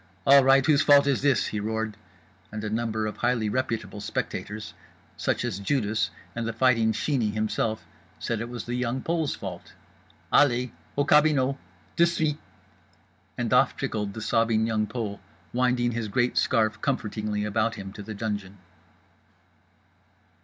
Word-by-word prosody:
"All 140 0 +8
right, 135 0 +5
whose 150 -2 +4
fault 140 -1 +6
is 140 -3 +1
this?" 140 -2 +3
he 105 - -3
roared. 110 0 -2 0.6
And 105 0 -5
a 105 - -3
number 110 -1 -1
of 105 - -4
highly 120 -3 +1
reputable 115 -3 -2
spectators, 105 +1 -4 0.4
such - - -1
as 105 -5 -3
Judas 110 -1 0 0.3
and 115 -1 -2
The 115 - -2
Fighting 115 -2 +3
Sheeney 115 -1 0
himself, 110 +1 -1 0.3
said 115 -2 -3
it 115 - -5
was 120 -3 -6
The 120 - -4
Young 125 +1 -1
Pole's 165 -3 -1
fault. 90 -4 -8 0.6
"Allez! 125 -3 +4 0.3
Au 145 - +2
cabinot! 145 -3 +4 0.4
De 170 - +6
suite!" 155 -3 -1 1.0
And - - -1
off - - +4
trickled 105 -2 -3
the 110 - -5
sobbing 115 0 +2
Young 110 -2 0
Pole, 105 -2 -4 0.3
winding 125 -1 +2
his 115 -1 -3
great 120 +3 0
scarf 110 -3 +1
comfortingly 105 -5 -2
about 110 +2 0
him, 95 -2 -8
to 105 - -8
the 110 +1 -7
dungeon. 100 -2 -4
115 Hz, 155 wpm, -26 LUFS, 105-130 Hz, 1.0 s, All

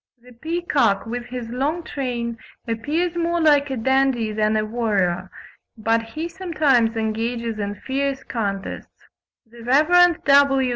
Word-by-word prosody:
The 250 +1 -17
peacock 285 - 0
with 240 +1 -5
his 245 -2 -6
long 290 +7 -1
train 240 -6 -4 0.3
appears 305 +10 -1
more 340 0 0
like 295 -3 +4
a 265 - -3
dandy 265 -2 +1
than 215 0 +1
a 215 - 0
warrior, 210 -6 -1 0.5
but 225 +1 +1
he 305 +9 -6
sometimes 305 -11 +1
engages 225 +1 -2
in 205 0 -3
fierce 275 0 -2
contests: 200 -4 -5 0.4
the 235 +1 -15
Rev. 315 +7 +4
W. 275 -2 +4
245 Hz, 135 wpm, -22 LUFS, 225-290 Hz, 0.5 s, like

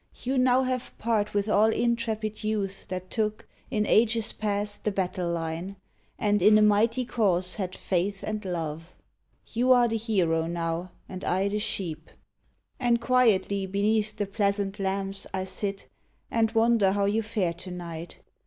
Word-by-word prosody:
You 260 +1 +1
now 255 +1 +4
have 255 -1 -3
part 215 -2 0
with 205 0 +1
all 215 +1 +4
intrepid 225 -2 -1
youth 200 -3 -2
That 185 0 -6
took, 215 -2 -2 0.2
in 210 -1 0
ages 225 0 +3
past, 205 -1 -2
the - - +1
battle 185 -2 -2
line, 170 +3 -3 0.4
And 205 -1 +1
in 210 +3 +7
a 215 - +5
mighty 225 +4 +3
Cause 185 -6 0
had 185 -2 -3
faith 190 +2 -1
and 215 0 -3
love. 165 -2 -5 0.6
You 250 +2 +2
are 245 -1 +6
the 225 0 -1
hero 175 -8 +1
now, 170 +1 -3 0.2
and 185 0 -8
I 190 +2 +1
the 210 +1 -1
sheep! 165 -7 -3 0.7
And 240 -2 +2
quietly 210 -6 +2
beneath 210 +2 +1
the 205 - -1
pleasant 200 0 -1
lamps 195 0 -1
HENRI 190 - -1
I - - -3
sit, 195 +1 -3 0.4
and 225 -1 +2
wonder 225 -4 +4
how 200 0 +1
you 210 +3 +1
fare 210 -6 -1
to 175 +2 -10
night. 170 -2 -7
205 Hz, 160 wpm, -27 LUFS, 185-220 Hz, 0.7 s, in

